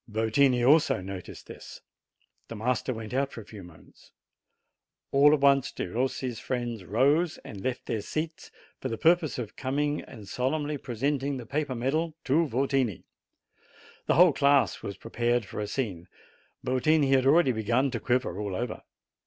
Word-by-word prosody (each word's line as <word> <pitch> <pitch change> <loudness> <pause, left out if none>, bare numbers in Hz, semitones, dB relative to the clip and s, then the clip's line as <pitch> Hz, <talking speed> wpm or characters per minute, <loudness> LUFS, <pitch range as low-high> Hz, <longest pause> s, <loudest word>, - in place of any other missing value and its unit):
Yotini 120 +4 +2
also 150 -5 +4
noticed 95 -1 -8
this. - - -11 0.7
The 115 - -7
master 125 +3 -1
went 110 -1 -6
out 135 +1 +1
tor 115 - -8
a - - -23
few 105 -1 -11
moments. 85 -3 -17 1.0
All 140 +2 +6
at 150 -2 +2
once 140 -2 +4
Perossi's 125 +3 -3
friends 120 -5 -3
rose 140 - +2
and 100 -3 -8
left 130 -1 -3
their 110 - -2
seats, 160 - -5 0.3
for 130 - -4
the 115 - -3
purpose 165 0 +2
of 115 -4 -6
coming 145 +3 -1
and 110 -6 -12
solemnly 145 +5 -2
presenting 135 +3 -2
the 120 - -8
paper 145 +1 -2
medal 150 +7 -1
to 155 +5 +2
Yotini. 130 -4 0 1.0
The - - +3
whole 175 0 +7
class 140 -1 +3
was 100 - -6
prepared 120 -1 -1
for - - -7
a 105 - -2
scene. 100 -8 -4 0.6
Yotini 140 +2 +2
had 135 -1 +4
already 145 -1 +5
begun 120 +4 0
to 120 - -3
quiver 125 +2 -1
all 100 -3 -3
over. 120 +2 -4
130 Hz, 160 wpm, -28 LUFS, 115-140 Hz, 1.0 s, whole